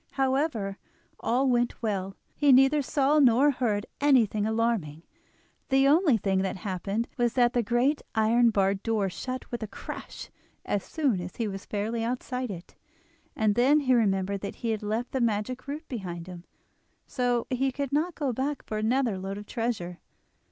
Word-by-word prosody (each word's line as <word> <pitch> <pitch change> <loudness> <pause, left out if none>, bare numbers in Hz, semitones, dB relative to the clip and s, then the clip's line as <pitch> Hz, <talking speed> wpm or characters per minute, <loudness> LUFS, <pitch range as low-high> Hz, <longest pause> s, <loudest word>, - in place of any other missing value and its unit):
However, 265 -7 0 0.4
all 260 +3 +1
went 240 -1 +1
well—he 200 +7 -1
neither 270 +3 +5
saw 285 +2 +2
nor 265 +2 +5
heard 220 -6 -1
anything 230 -7 +3
alarming; 220 -9 -1 0.7
the 270 0 +4
only 300 -3 +4
thing 195 -2 0
that 190 0 -2
happened 200 +4 -3
was 240 -2 +1
that 245 -1 +3
the 245 - +2
great 240 +6 +1
iron 230 +2 +4
barred 195 -2 +1
door 210 -4 0
shut 255 +6 -6
with 240 - -4
a 220 - -3
crash - - -8 0.3
as 205 - -1
soon 270 - 0
as 175 0 -7
he 230 - -2
was 195 -1 -6
fairly 220 +2 -2
outside 250 +1 -3
it, 180 -3 -8 0.6
and 215 -1 +2
then 265 +7 +4
he 260 -2 +2
remembered 200 -4 +1
that 200 - -5
he 230 - -2
had 215 - -2
left 220 +4 -2
the 265 - -1
magic 230 +3 -1
root 300 +3 -6
behind 180 -8 -5
him, 180 -1 -10 0.6
so 245 -2 0
he 265 +1 +1
could 280 0 -4
not 320 +4 0
go 275 -4 -1
back 275 +4 -2
for 215 - -3
another 230 -2 +1
load 195 +1 -5
of 205 - -8
treasure. 210 -7 -3
235 Hz, 170 wpm, -27 LUFS, 200-265 Hz, 0.7 s, neither